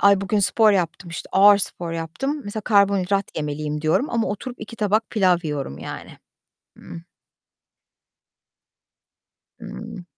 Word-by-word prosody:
"Ay, 200 -1 +5
bugün 205 +1 0
spor 215 +2 +4
yaptım, 175 -2 -2
işte, 165 - -7
ağır 200 +1 +7
spor 175 -3 -3
yaptım. 175 - -3
Mesela 205 +1 -5
karbonhidrat 200 -2 +1
yemeliyim." 150 0 -3
diyorum 160 - +1
ama 230 -4 0
oturup 240 +5 -6
2 230 - -9
tabak 215 +1 0
pilav 185 -5 +3
yiyorum 145 - -4
yani. - - -9 0.6
Ih. - - -16 2.8
Hıı. 185 -4 -8
195 Hz, 125 wpm, -22 LUFS, 165-210 Hz, 2.8 s, ağır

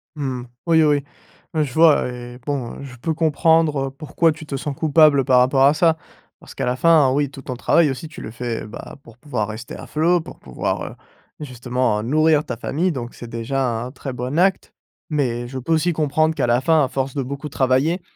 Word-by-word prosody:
Mmh, 130 -4 -3 0.2
oui 160 -1 +5
oui. 145 -2 +2 0.5
Ouais, 155 -1 +2
je 130 -3 -5
vois 160 -5 +5
et 120 0 -9
bon, 135 -5 -3
heu, - - -8
je 130 -2 -10
peux 160 +7 -2
comprendre, 160 -2 +2
heu, - - -6
pourquoi 155 +3 0
tu 155 0 -9
te 145 - -5
sens 140 +1 -4
coupable 150 -2 +4
par 130 -2 +5
rapport 135 +2 +3
à 145 - +5
ça 160 0 +3 0.4
parce - - -14
qu'à - - -2
la 125 +1 -1
fin, 155 -5 +5
oui, 145 0 +1
tout 135 -1 -11
ton 125 - -6
travail 155 +1 +3
aussi 145 +5 -6
tu 155 - -11
le 110 - -7
fais, 115 -2 -4
bah, 105 - -9
pour 115 0 -16
pouvoir 120 -7 -3
rester 110 +2 -7
à - - -9
flot, 170 +3 +2
pour - - -12
pouvoir, 65 - -3
heu, - - -7 0.5
justement 125 -4 -1
nourrir 155 +4 +3
ta 125 - -5
famille 170 +9 -1
donc 120 -4 -6
c'est 120 - -10
déjà 125 +4 -2 0.2
un 125 - -7
très 135 0 -7
bon 125 +5 -4
acte, 190 +1 +1 0.4
mais 120 -5 -1
je 130 +2 -7
peux 165 +6 -1
aussi 170 +2 +2
comprendre 155 +1 +1
qu'à 135 -5 0
la 120 +1 +2
fin, 160 +1 +3
à 130 - +1
force 135 0 -3
de 135 - -1
beaucoup 140 +3 -6
travailler, 135 +8 +1
140 Hz, 220 wpm, -21 LUFS, 125-155 Hz, 0.5 s, oui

